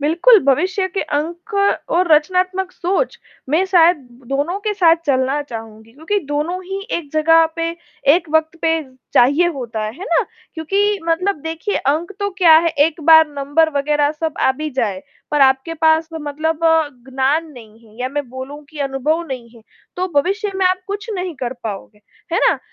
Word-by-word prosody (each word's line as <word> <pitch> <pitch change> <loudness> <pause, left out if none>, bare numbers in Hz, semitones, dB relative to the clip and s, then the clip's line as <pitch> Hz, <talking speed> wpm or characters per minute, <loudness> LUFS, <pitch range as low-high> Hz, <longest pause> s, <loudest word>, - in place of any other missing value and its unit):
बिल्कुल, 340 +11 +5
भविष्य 370 +8 +1
के 390 - 0
अंक 335 +7 -4 0.4
और 345 -1 +2
रचनात्मक 365 +4 +1
सोच, 385 +8 -1 0.3
मैं 315 +7 +2
शायद 350 -2 +5 0.3
दोनों 290 +7 -1
के 425 +1 -1
साथ 335 -4 +5
चलना 270 +1 +1
चाहूँगी, 225 -4 -10
क्योंकि 320 - -2
दोनों 320 +6 -2
ही 385 +2 -5 0.2
एक 305 -4 -7
जगह 325 +1 +5
पे, 330 0 -1 0.4
एक 335 -1 -1
वक़्त 315 +1 +1
पे 325 - +3 0.4
चाहिए 285 +8 +4
होता 235 -5 -5
है। 215 - -4
है 380 - -6
ना? 335 -4 +2 0.3
क्योंकि 395 +6 0
मतलब 365 +4 +1
देखिए, 325 +5 -3
अंक 315 +7 -1
तो 405 0 -1
क्या 335 -4 +7
है, 335 +1 +1
एक 310 +1 +1
बार 320 0 +8
नंबर 290 +3 +1
वगैरह 295 +1 +1
सब 315 0 -4
आ - - +4
भी 305 +3 -5
जाए, 215 -8 -2 0.3
पर 295 -1 +1
आपके 265 +4 +3
पास 320 0 +2
तो 325 - -6
मतलब 310 +2 -2 0.5
ज्ञान 270 +5 0
नहीं 225 -4 -14
है, 215 0 -20
या 255 - -1
मैं 285 -1 -4
बोलूँ, 260 +4 -8
कि 310 - -11
अनुभव 280 +4 -1
नहीं 255 -5 -6
है, 230 - -17 0.3
तो 365 +1 -1
भविष्य 400 +5 -2
में 380 -1 +2
आप 370 0 +1
कुछ 410 +2 -5
नहीं 360 -2 -4
कर 245 -1 -2
पाओगे। 210 0 -7 0.3
है 345 - +2
ना? - - +1
320 Hz, 180 wpm, -18 LUFS, 275-355 Hz, 0.5 s, बार